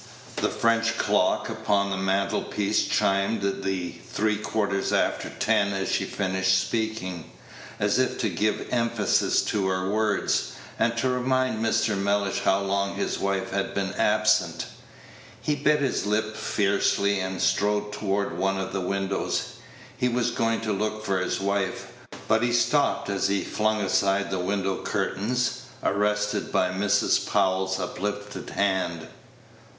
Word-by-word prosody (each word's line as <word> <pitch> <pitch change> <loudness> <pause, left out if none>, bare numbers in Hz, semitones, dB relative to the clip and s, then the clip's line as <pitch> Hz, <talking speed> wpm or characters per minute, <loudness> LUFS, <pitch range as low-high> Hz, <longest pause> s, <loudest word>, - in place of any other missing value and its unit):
The - - +1
French 115 0 +1
clock - - +2
upon 100 -1 0
the - - 0
mantle 95 +1 0
piece 105 +1 0
chimed 100 +2 +1 0.2
the 95 -2 -2 0.2
three 105 0 +1
quarters 100 -2 -1
after - - 0
ten 100 0 +1
as 95 0 -2
she - - +1
finished 95 -1 +1
speaking, 110 -7 -3 0.5
as - - +2
if - - +1
to - - +1
give 105 0 -1
emphasis 115 -3 +2
to 100 -3 0
her 95 0 -1
words, 105 -1 0 0.3
and 115 0 +1
to 130 - +1
remind 130 -2 0
Mr. 110 -1 +1
Mellish 100 0 0
how 95 +1 +2
long 100 0 -1
his - - -2
wife 95 -1 -1
had 100 0 -2
been 95 -1 -1
absent. 105 -6 +2 0.7
He 150 - 0
bit 150 +1 +2
his 130 -7 0
lip 110 +1 0
fiercely, 100 0 +1
and 95 0 -3
strode 105 +2 +1
toward 100 -1 -1
one 95 0 +1
of 95 0 -4
the 95 - -1
windows. 95 +1 -2 0.4
He 125 -1 +1
was 120 0 0
going 115 -1 0
to 110 -2 -1
look 110 +2 -2
for 95 -2 +1
his 90 - -1
wife; 100 -1 -2 0.4
but 110 +1 +3
he 120 0 +1
stopped 145 +4 +2
as 100 -1 0
he 100 0 0
flung 110 0 0
aside 100 0 +1
the 95 - -1
window 95 +1 -1
curtain, 105 +6 -1 0.5
arrested 105 +1 0
by 90 - +2
Mrs. 100 +2 +2
Powell's 95 -1 +1
uplifted 105 +2 -4
hand. 95 -5 -1
100 Hz, 145 wpm, -26 LUFS, 95-110 Hz, 0.7 s, but